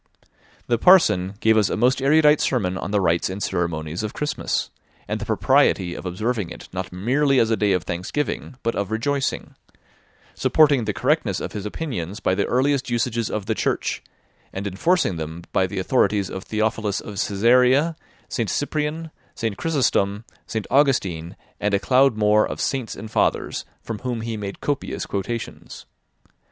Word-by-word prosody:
The 120 -2 +1
parson 105 - +5
gave 110 0 +4
us 105 -3 +3
a - - -1
most 125 +4 +2
erudite 150 +2 +5
sermon 95 -8 0
on 95 - -4
the 105 0 +1
rites 85 -2 +1
and 95 +2 -5
ceremonies 85 -2 -2
of 110 -1 -5
Christmas, 150 - -2 0.4
and - - -3
the - - -5
propriety 90 -2 +2
of 95 - -6
observing 105 +1 -2
it - - -10
not 95 0 -4
merely 130 +9 +2
as 115 0 +2
a - - +4
day 105 -2 +1
of 90 -3 0
thanksgiving, 95 +11 -3
but 115 - 0
of 100 -1 -2
rejoicing; 135 +5 -1 0.8
supporting 145 -6 +3
the 105 - -1
correctness 125 - +1
of - - -5
his 105 -1 -5
opinions 105 - -4
by 95 - +1
the 100 +1 0
earliest 130 +1 +1
usages 115 -1 -1
of 105 -2 -3
the - - 0
Church, - - -1 0.5
and 95 +1 -5
enforcing 100 - +1
them 80 +2 -6
by 95 - +2
the 95 - -7
authorities 100 -1 +1
of 95 - -6
Theophilus 110 -1 -1
of 100 -2 -7
Cesarea, 125 +9 +3 0.3
St. 115 -4 -2
Cyprian, 155 +2 -2 0.2
St. 110 -2 -2
Chrysostom, 110 -8 0 0.2
St. 110 -2 -3
Augustine, 100 - +1 0.2
and 105 0 +1
a - - +1
cloud 130 0 +3
more 105 0 +4
of - - -6
Saints 130 -6 -2
and 110 +1 -9
Fathers, - - 0 0.2
from 115 -2 -5
whom 125 -3 -3
he 115 0 -3
made 100 -2 -6
copious 145 -2 -2
quotations. 110 +4 -5
110 Hz, 165 wpm, -23 LUFS, 95-130 Hz, 0.8 s, parson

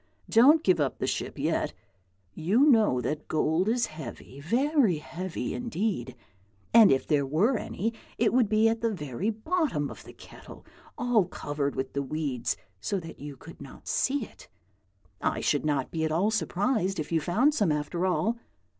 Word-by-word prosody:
Don't 285 +8 +6
give 185 -3 +3
up 140 -3 0
the - - -2
ship - - -3
yet. - - -1 0.6
You 200 - +3
know 220 - +4
that 150 +5 -3
gold 160 +5 +1
is 240 +1 +2
heavy, 155 -3 -9
very 240 - +2
heavy 175 +4 -5
indeed, 205 - -3 0.6
and 225 -3 +8
if 135 - +2
there 145 -3 +2
were 165 - +2
any 225 +1 -3 0.2
it 230 0 +2
would 245 -4 +3
be 215 +1 +4
at 225 0 0
the 230 - +1
very 160 - -3
bottom 225 - -1
of - - -11
the - - -13
kettle, - - -14 0.3
all 240 -5 +2
covered 145 -4 -3
with 130 0 -3
the 140 - -1
weeds, 140 -3 -2 0.2
so 190 - -2
that 165 -2 -10
you 145 -1 -8
could 165 +4 -13
not 140 - -12
see 270 -3 0
it. - - -17 0.7
I - - 0
should - - 0
not 140 -3 -1
be 160 -1 -2
at 160 - 0
all 185 +7 +2
surprised 200 -3 0
if 155 - -4
you 165 -1 +2
found 235 - +2
some, 205 - +2
after 150 +5 -1
all. 225 +5 0
185 Hz, 175 wpm, -28 LUFS, 150-230 Hz, 0.7 s, and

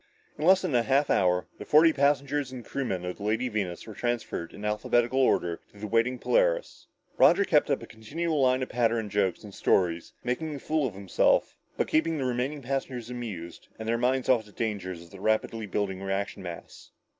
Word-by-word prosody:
In 150 - -3
less 190 0 +6
than 180 -6 -1
a 120 - +4
half 135 +4 +2
hour, 90 -1 +2
the - - -5
forty 160 +2 +5
passengers 140 -1 +1
and 125 -2 -8
crewmen 95 -10 -3
of 90 - -4
the 100 - -9
Lady 115 +4 0
Venus 100 -6 -3
were 110 - -9
transferred 120 -8 -3
in 105 - -8
alphabetical 120 +4 +1
order 85 -9 +2
to - - -19
the 105 - -6
waiting 115 +4 +1
Polaris. - - 0 0.3
Roger 200 - +6
kept 150 -7 +3
up 140 -4 0
a - - -6
continual 150 +9 -3
line 130 0 +3
of - - -5
patter 115 -1 +1
and 110 -3 -4
jokes 100 -3 0
and 105 -2 -10
stories, 85 -4 +1
making 145 +5 -2
a - - -6
fool 155 0 0
of 105 - -8
himself, 95 -1 +2 0.2
but - - +1
keeping 160 +1 +1
the 135 - -2
remaining 130 +4 -2
passengers 125 -2 -3
amused 105 -9 -7
and 110 - -6
their 115 - +2
minds 130 +2 +1
off 120 -4 +4
the 105 - -16
dangers 95 -6 -4
of 85 - -17
the 95 - -11
rapidly 110 0 0
building 95 -1 -2
reaction 95 +1 -3
mass. 85 -2 -9
120 Hz, 205 wpm, -28 LUFS, 100-135 Hz, 0.3 s, less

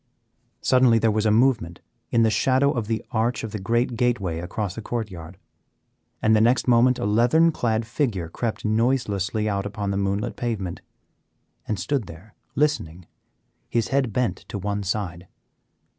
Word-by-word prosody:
Suddenly 125 -3 +4
there 115 0 +2
was 110 +1 +1
a - - +3
movement 110 -7 +2 0.3
in 115 - +3
the 110 - +3
shadow 130 +6 +3
of 120 -7 -3
the 110 0 -2
arch 115 0 0
of 110 - -5
the 105 - -4
great 120 +5 0
gateway 110 -9 0
across 90 +3 -4
the 115 - -7
court 110 -2 -4
yard, 85 0 -10 0.9
and 110 0 +5
the 110 - +4
next 120 +2 +3
moment 125 +1 +4
a - - -3
leathern 120 +11 +4
clad 115 -6 -1
figure 115 - -1
crept 110 +8 -4
noiselessly 110 -2 0
out 100 -1 -1
upon 105 -1 -3
the 100 - -1
moonlit 100 +4 -1
pavement, 100 -8 -3 0.9
and 105 -5 -2
stood 110 +3 -1
there 90 +6 -13 0.2
listening, 90 - -1 0.6
his 115 -2 0
head 135 -4 +1
bent 125 +3 0
to - - -5
one 100 +1 -2
side. 90 -3 -3
110 Hz, 165 wpm, -24 LUFS, 100-120 Hz, 0.9 s, and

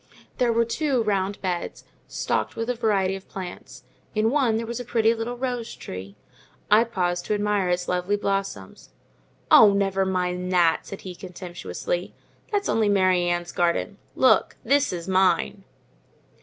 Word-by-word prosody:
There 245 -2 +3
were 230 0 +2
two 260 0 0
round 200 -1 -1
beds, 180 -2 -3 0.2
stocked - - -2
with 230 +2 -1
a - - -1
variety 205 -5 +1
of 195 - -11
plants. 185 -2 -8 0.3
In 215 +1 +2
one 255 -6 +2
there 230 - -3
was 235 +1 -5
a - - -4
pretty 230 -2 +2
little 235 +2 -4
rose 245 -2 -3
tree. 95 +2 -8 0.6
I 220 +3 +6
paused 175 -5 -1
to 210 - 0
admire 205 -2 0
its 180 0 -1
lovely 180 +3 0
blossoms. 195 - -3 0.6
"Oh, 210 -2 +8
never 195 -1 +1
mind 180 -1 -1
that!" 170 -2 +3
said 195 - -8
he, 185 - -7
contemptuously. 180 - -5 0.4
"That's 410 -1 0
only 220 -2 +2
Mary 185 -3 +3
Ann's 175 0 -2
garden; 175 +4 0 0.2
look, 260 - +3
THIS 285 +4 +2
is 175 -1 -5
mine." 190 +1 +1
195 Hz, 155 wpm, -24 LUFS, 180-230 Hz, 0.6 s, Oh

